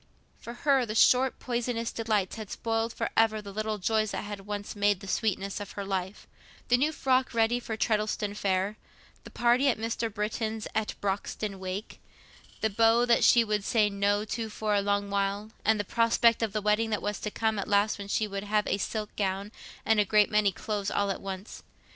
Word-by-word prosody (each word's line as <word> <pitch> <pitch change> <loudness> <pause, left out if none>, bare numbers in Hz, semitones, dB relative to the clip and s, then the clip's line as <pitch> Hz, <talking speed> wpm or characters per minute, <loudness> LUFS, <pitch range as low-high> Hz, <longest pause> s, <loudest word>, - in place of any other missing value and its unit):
For 235 - -8
her 265 -6 +3
short 255 +3 +4
poisonous 240 -1 -2
delights 215 -4 -1
had 215 -3 -7
spoiled 225 0 -1
for - - -3
ever 225 -1 +4
all 215 - -4
the 200 - -8
little 215 +1 -2
joys 215 +2 +1
that - - -4
had 205 -1 -7
once 205 0 -5
made 205 -1 +2
the 195 - -10
sweetness 195 -1 -1
of 205 -1 -7
her 200 - -5
life—the 195 +5 -3
new 295 +5 +2
frock 260 -4 +1
ready 230 +2 +2
for 225 -2 -5
Treddleston 210 -2 0
Fair, 195 0 -1 0.5
the - - -9
party 240 +3 +2
at 245 - +1
Mr. 225 0 -2
Britton's 215 +1 -3
at 220 -1 -1
Broxton 200 0 -3
wake, 190 +3 -6 0.6
the 220 - +2
beaux 225 +3 +4
that 235 -1 +3
she 235 - +6
would 210 -2 -1
say 210 -1 +2
"No" 205 +1 +1
to 225 +1 -4
for 215 0 -2
a 200 - +3
long 200 0 -1
while, 200 +2 -1
and 220 0 +3
the - - 0
prospect 230 +2 +3
of 225 -2 0
the 210 0 -3
wedding 210 +2 +2
that 210 - -2
was 205 0 -2
to 210 - -3
come 220 0 -1
at 195 - -3
last 205 +1 +2
when 200 - -6
she 215 +1 0
would 200 0 -5
have 210 0 +1
a 195 - -1
silk 210 +1 -4
gown 195 0 -2 0.3
and 225 -1 +3
a - - +5
great 210 +1 +3
many 210 -1 +3
clothes 205 +1 -3
all 200 -1 0
at - - -5
once. 195 +1 -7
210 Hz, 205 wpm, -28 LUFS, 200-225 Hz, 0.6 s, she